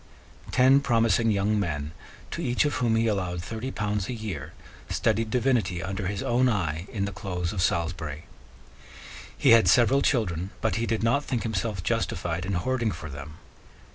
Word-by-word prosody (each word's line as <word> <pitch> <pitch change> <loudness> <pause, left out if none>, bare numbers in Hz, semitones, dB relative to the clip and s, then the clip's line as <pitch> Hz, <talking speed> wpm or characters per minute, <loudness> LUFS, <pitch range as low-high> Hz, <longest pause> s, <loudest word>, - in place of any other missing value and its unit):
Ten 130 +2 +5
promising 115 -4 +2
young 105 0 +1
men, 75 -6 -2 0.4
to 170 - -4
each 125 -2 +1
of 145 - 0
whom 115 -3 +2
he 115 0 +2
allowed 90 -5 -1
thirty 115 +6 -5
pounds 105 -4 -2
a - - -2
year, 105 - -6 0.4
studied 115 0 0
divinity 115 -8 +1
under 95 +1 -3
his 100 +1 -3
own 125 +2 +2
eye 85 -5 -1
in 100 -5 -1
the 100 - -4
close 90 -3 -3
of 95 - -2
Salisbury. 85 -4 -1 1.1
He - - +4
had 115 -1 +7
several 130 +3 +5
children 95 - 0
but 110 - 0
he 115 0 -1
did 110 -1 -1
not 140 +6 +2
think 125 -5 -2
himself 105 -3 -2
justified 85 +1 -1
in 100 - -1
hoarding 120 +4 0
for 80 -5 -7
them. 75 +2 -9
105 Hz, 170 wpm, -26 LUFS, 90-115 Hz, 1.1 s, had